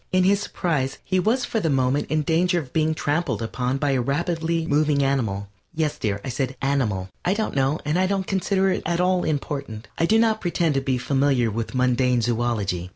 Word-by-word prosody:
In 185 0 +3
his 195 +2 +3
surprise 135 -10 -2
he 185 0 0
was 230 +7 +1
for 225 - -1
the 165 - 0
moment 135 +1 +1
in 155 0 +1
danger 175 +3 +2
of 140 -7 -5
being 160 0 +1
trampled 155 +4 -1
upon 125 +3 -2
by 145 0 0
a 130 -2 +1
rapidly 165 +4 -1
moving 150 -1 +2
animal. 110 -8 -1 0.3
Yes, 155 -2 -1
dear, 100 -2 -1
I - - -3
said 130 +1 -3
"animal." 115 -10 0
I 185 - +1
don't 220 -7 -2
know 135 +2 +2
and 150 +4 +1
I 185 - +3
don't 195 -1 -1
consider 195 0 +1
it - - -1
at 170 +1 -1
all 180 0 +2
important. 140 -7 -3
I 165 - +3
do 220 - +4
not 225 -1 +2
pretend 170 -3 +1
to 135 - 0
be 135 -1 0
familiar 135 -2 +1
with 115 +4 -4
mundane 125 -1 +2
zoölogy. 110 -7 -1
145 Hz, 210 wpm, -23 LUFS, 125-175 Hz, 0.3 s, do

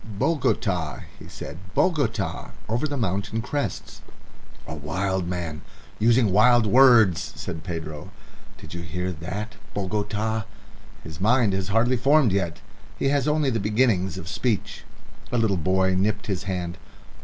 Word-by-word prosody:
"Bogota," 100 - -1 0.2
he - - -11
said. 80 - -8 0.2
"Bogota. 115 - 0 0.2
Over 120 +7 0
the 145 -1 -3
mountain 100 0 -1
crests." 140 +5 -4 0.6
"A - - -6
wild 90 +5 -2
man 85 -4 -4 0.4
using 115 -1 +4
wild 120 +4 +5
words," 115 -6 +5
said 80 - -6
Pedro. 80 -1 -6 0.5
"Did 100 -2 -11
you 85 - -5
hear 90 +3 -3
that 95 +6 -6 0.2
Bogota? 105 +2 -1 0.6
His 80 +3 -9
mind 110 -1 +3
is 95 -1 -1
hardly 115 +5 +2
formed 140 -1 +4
yet. 90 -4 -1 0.4
He 135 - +1
has 140 0 +1
only 150 -2 +2
the 115 - 0
beginnings 105 -4 +1
of 90 - -7
speech." 100 +2 -2 0.5
A 125 - +1
little 110 -4 +2
boy 95 +2 +2
nipped 100 +2 0
his 95 -3 -3
hand. 90 -3 -3
100 Hz, 140 wpm, -24 LUFS, 90-115 Hz, 0.6 s, wild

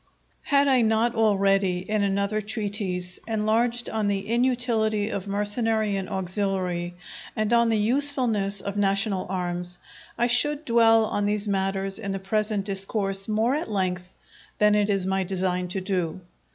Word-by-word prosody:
Had 280 0 +2
I 260 -3 +4
not 225 +1 +1
already, 195 -4 +1
in 215 0 0
another 200 +2 0
treatise, 205 -4 -3
enlarged 230 +2 0
on 220 -2 -2
the 200 -1 -2
inutility 230 -3 +1
of 200 0 -5
mercenary 210 +1 0
and 195 -1 -4
auxiliary, 185 -2 -2 0.4
and 215 +1 0
on 235 0 +4
the 225 - +2
usefulness 225 -4 +2
of 200 0 -5
national 195 -1 +1
arms, 180 -1 -3 0.4
I 240 - +2
should 295 +5 +2
dwell 225 -1 +4
on 205 -1 -1
these 210 0 +1
matters 195 0 0
in 200 -3 -4
the - - -2
present 210 +1 -1
Discourse 195 0 +1
more 220 +4 +1
at 300 -4 -3
length 185 -3 -3 0.4
than 210 0 +4
it 210 0 +1
is 195 -2 +1
my 190 0 0
design 180 -1 -2
to 190 +2 -3
do. 185 -3 -3
205 Hz, 150 wpm, -24 LUFS, 195-225 Hz, 0.4 s, I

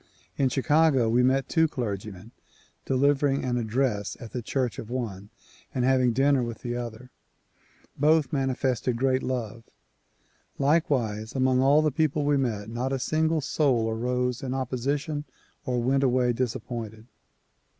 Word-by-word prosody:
In 135 -2 +2
Chicago 145 -1 +3
we 120 +2 +3
met 130 +2 +2
two 160 -1 +3
clergymen, 105 - -5 0.3
— - - -34
delivering 140 +1 +2
an 125 -1 0
address 115 -2 -1
at 115 - -9
the 125 - -4
church 125 +1 -2
of 110 - -8
one 105 -6 -4 0.5
and 125 -1 +1
having 130 -2 +3
dinner 135 +2 +3
with 115 -2 -5
the 120 -1 -3
other. 120 +1 -7 0.8
Both 150 -1 +2
mani 135 -2 +1
fested 125 -2 -1
great 130 +2 +1
love. 115 -3 -4 0.9
Likewise 125 -7 0
among 130 -1 +2
all 145 +3 +5
the 155 - +2
people 150 0 0
we 145 0 +3
met, 115 -7 -1
not 120 +4 -3
a 135 - 0
single 155 +4 0
soul 135 -6 +1
arose 125 +1 -1
in 130 -1 -3
opposition 140 +4 -2 0.4
or 125 -1 0
went 130 +3 +1
away 125 -2 +2
disappointed. 115 -2 -4
130 Hz, 150 wpm, -26 LUFS, 115-140 Hz, 0.9 s, all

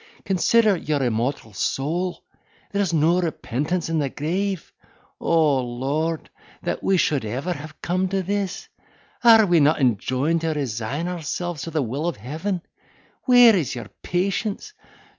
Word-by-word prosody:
Consider 210 +3 +3
your 150 -5 -1
immortal 120 -1 -1
soul—there's 175 - -3
no 165 +3 +3
repentance 160 +1 -2
in 165 -1 0
the 140 -2 0
grave! 185 +6 -3 0.5
O 155 -5 +3
Lord! 140 +7 -2 0.3
that - - -2
we 195 - +3
ever - - +3
should 145 -6 +1
have 145 +7 -5
come 185 +2 0
to 190 0 -1
this! 195 0 -3 0.6
Are 225 -2 +8
we 175 -3 +4
not 150 +2 +4
enjoined 130 +6 +1
to 165 -1 0
resign 135 +3 -3
ourselves 175 -1 -4
to - - -5
the 155 -3 0
will 135 +8 -3
of 175 - -2
Heaven?—where 195 - +1
is 160 -8 -1
your 120 - -7
patience? 200 - -2
165 Hz, 135 wpm, -23 LUFS, 140-185 Hz, 0.6 s, Are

